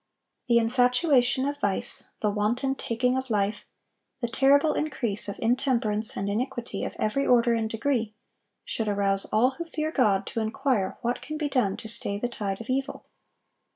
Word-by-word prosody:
The 235 Hz, -1 st, +4 dB
infatuation 250 Hz, +3 st, +3 dB
of 285 Hz, 0 st, -3 dB
vice, 200 Hz, -2 st, -1 dB, 0.2 s
the 210 Hz, -, +1 dB
wanton 235 Hz, +6 st, 0 dB
taking 250 Hz, -1 st, -1 dB
of 260 Hz, 0 st, -3 dB
life, 205 Hz, -1 st, -1 dB, 0.5 s
the 240 Hz, -, -2 dB
terrible 280 Hz, +5 st, +3 dB
increase 235 Hz, -10 st, +1 dB
of 200 Hz, -, -4 dB
intemperance 230 Hz, -3 st, +1 dB
and 195 Hz, -, -2 dB
iniquity 240 Hz, +3 st, -3 dB
of -, -, -5 dB
every 275 Hz, +6 st, 0 dB
order 240 Hz, -1 st, +4 dB
and 225 Hz, -1 st, -1 dB
degree, 225 Hz, -2 st, -1 dB, 0.5 s
should 225 Hz, -, -3 dB
arouse 200 Hz, -1 st, +1 dB
all 245 Hz, +4 st, +2 dB
who -, -, -1 dB
fear 315 Hz, -1 st, -3 dB
God, 205 Hz, -9 st, +2 dB
to -, -, -4 dB
inquire 220 Hz, -2 st, -1 dB
what 240 Hz, 0 st, -2 dB
can 305 Hz, +1 st, -6 dB
be 300 Hz, -1 st, -2 dB
done 240 Hz, -8 st, 0 dB
to -, -, -8 dB
stay 200 Hz, -2 st, +1 dB
the 245 Hz, -, -2 dB
tide 200 Hz, -4 st, -4 dB
of 230 Hz, -, -8 dB
evil. 270 Hz, +1 st, -3 dB
235 Hz, 170 wpm, -26 LUFS, 215-265 Hz, 0.5 s, The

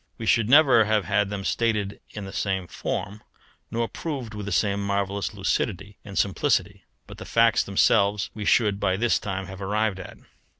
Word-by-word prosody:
We 115 Hz, -, -6 dB
should 115 Hz, 0 st, +2 dB
never 135 Hz, -6 st, +6 dB
have 110 Hz, -2 st, +1 dB
had 100 Hz, 0 st, +1 dB
them 100 Hz, -1 st, -5 dB
stated 105 Hz, -4 st, -1 dB
in 105 Hz, -2 st, -7 dB
the 95 Hz, -, -9 dB
same 95 Hz, -2 st, -1 dB
form, 100 Hz, +4 st, -5 dB, 0.5 s
nor 115 Hz, 0 st, -1 dB
proved 135 Hz, -8 st, -5 dB
with 105 Hz, -1 st, -6 dB
the -, -, -3 dB
same 100 Hz, -1 st, +1 dB
marvellous 100 Hz, -2 st, -1 dB
lucidity 100 Hz, +2 st, -2 dB
and 100 Hz, -1 st, -8 dB
simplicity, 100 Hz, -2 st, 0 dB, 0.2 s
but -, -, -12 dB
the -, -, -7 dB
facts 115 Hz, 0 st, +3 dB
themselves 100 Hz, 0 st, +2 dB
we 105 Hz, -, -6 dB
should 105 Hz, -1 st, +2 dB
by 95 Hz, -1 st, +1 dB
this 120 Hz, +2 st, +2 dB
time 95 Hz, -1 st, -4 dB
have 95 Hz, +1 st, -10 dB
arrived 105 Hz, 0 st, -1 dB
at. 95 Hz, -, -10 dB
100 Hz, 180 wpm, -25 LUFS, 100-110 Hz, 0.5 s, never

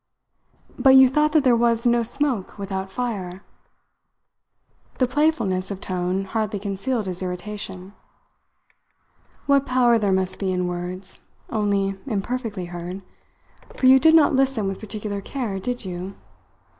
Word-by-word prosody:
"But 265 Hz, -1 st, +6 dB
you 265 Hz, 0 st, +9 dB
thought 300 Hz, +4 st, +2 dB
that 310 Hz, -3 st, +4 dB
there 250 Hz, -3 st, +5 dB
was 230 Hz, 0 st, +2 dB
no 240 Hz, 0 st, +3 dB
smoke 240 Hz, -4 st, -2 dB
without 195 Hz, -1 st, -4 dB
fire!" 195 Hz, -5 st, -4 dB, 1.5 s
the 255 Hz, -, +3 dB
playfulness 250 Hz, -9 st, 0 dB
of 200 Hz, -2 st, -5 dB
tone 185 Hz, +1 st, -2 dB
hardly 215 Hz, 0 st, -2 dB
concealed 205 Hz, +4 st, -2 dB
his 185 Hz, -1 st, -4 dB
irritation. 190 Hz, +1 st, -5 dB, 1.5 s
"What 280 Hz, -1 st, +3 dB
power 245 Hz, -2 st, +3 dB
there 205 Hz, -2 st, +1 dB
must 190 Hz, 0 st, 0 dB
be 190 Hz, -2 st, -1 dB
in 180 Hz, -1 st, -1 dB
words, 180 Hz, +2 st, -6 dB, 0.3 s
only 200 Hz, -3 st, 0 dB
imperfectly 220 Hz, -3 st, -3 dB
heard 175 Hz, +2 st, -7 dB, 0.7 s
for -, -, 0 dB
you 260 Hz, +1 st, +8 dB
did 320 Hz, +3 st, +5 dB
not 315 Hz, -3 st, +5 dB
listen 265 Hz, -6 st, +1 dB
with 195 Hz, -1 st, -4 dB
particular 210 Hz, -1 st, -5 dB
care, 220 Hz, -4 st, -4 dB
did 245 Hz, +2 st, -4 dB
you? 185 Hz, +1 st, -6 dB
205 Hz, 135 wpm, -23 LUFS, 190-250 Hz, 1.5 s, you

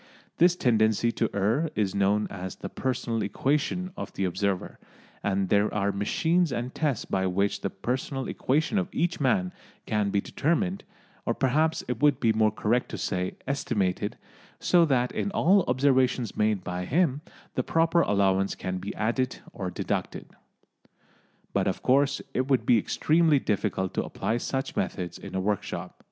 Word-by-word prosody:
This 175 Hz, +1 st, +5 dB
tendency 110 Hz, -, +2 dB
to 115 Hz, -, 0 dB
err 115 Hz, +11 st, +1 dB
is 100 Hz, -3 st, 0 dB
known 100 Hz, +2 st, +2 dB
as 95 Hz, -1 st, -6 dB
the -, -, -7 dB
"personal 120 Hz, -3 st, -2 dB
equation" 145 Hz, -, -1 dB
of -, -, -6 dB
the 95 Hz, -, -1 dB
observer, 95 Hz, +1 st, -2 dB, 0.4 s
and 95 Hz, -2 st, 0 dB
there 100 Hz, +1 st, +3 dB
are 100 Hz, -1 st, 0 dB
machines 165 Hz, -, +1 dB
and 125 Hz, +1 st, -3 dB
tests 145 Hz, -8 st, -1 dB
by 95 Hz, -1 st, 0 dB
which 100 Hz, +2 st, 0 dB
the 100 Hz, -, -1 dB
personal 130 Hz, +6 st, -3 dB
equation 155 Hz, +9 st, 0 dB
of 185 Hz, -, -2 dB
each 175 Hz, +2 st, -1 dB
man 110 Hz, -10 st, +1 dB, 0.3 s
can 105 Hz, -2 st, 0 dB
be 100 Hz, -, +1 dB
determined, 180 Hz, -, -1 dB, 0.4 s
or 115 Hz, -, -1 dB
perhaps 155 Hz, +5 st, +1 dB
it 125 Hz, +2 st, -3 dB
would 145 Hz, -3 st, +4 dB
be 115 Hz, -4 st, +3 dB
more 110 Hz, 0 st, +3 dB
correct 110 Hz, +3 st, 0 dB
to -, -, -5 dB
say 90 Hz, -1 st, -2 dB
estimated, 105 Hz, -7 st, -1 dB, 0.4 s
so 175 Hz, -2 st, +4 dB
that 125 Hz, -4 st, +1 dB
in -, -, -2 dB
all 190 Hz, +3 st, +4 dB
observations 130 Hz, -2 st, +2 dB
made 105 Hz, -3 st, +1 dB
by 90 Hz, 0 st, -4 dB
him 145 Hz, -, +1 dB, 0.3 s
the -, -, 0 dB
proper 165 Hz, +1 st, +2 dB
allowance 95 Hz, -, +2 dB
can 95 Hz, 0 st, -4 dB
be 100 Hz, +3 st, -6 dB
added 125 Hz, +4 st, -1 dB, 0.2 s
or 95 Hz, -3 st, -4 dB
deducted. 90 Hz, -, -3 dB, 1.3 s
But 100 Hz, -1 st, +1 dB
of 95 Hz, -, -2 dB
course 140 Hz, +2 st, +3 dB
it 130 Hz, +1 st, 0 dB
would 130 Hz, -5 st, +2 dB
be 120 Hz, -2 st, +5 dB
extremely 155 Hz, +7 st, +3 dB
difficult 100 Hz, -6 st, -1 dB
to -, -, 0 dB
apply 115 Hz, -, -2 dB
such 135 Hz, +2 st, -3 dB
methods 90 Hz, -2 st, -3 dB
in -, -, -8 dB
a -, -, +1 dB
workshop. 100 Hz, +1 st, -3 dB
115 Hz, 165 wpm, -27 LUFS, 100-140 Hz, 1.3 s, This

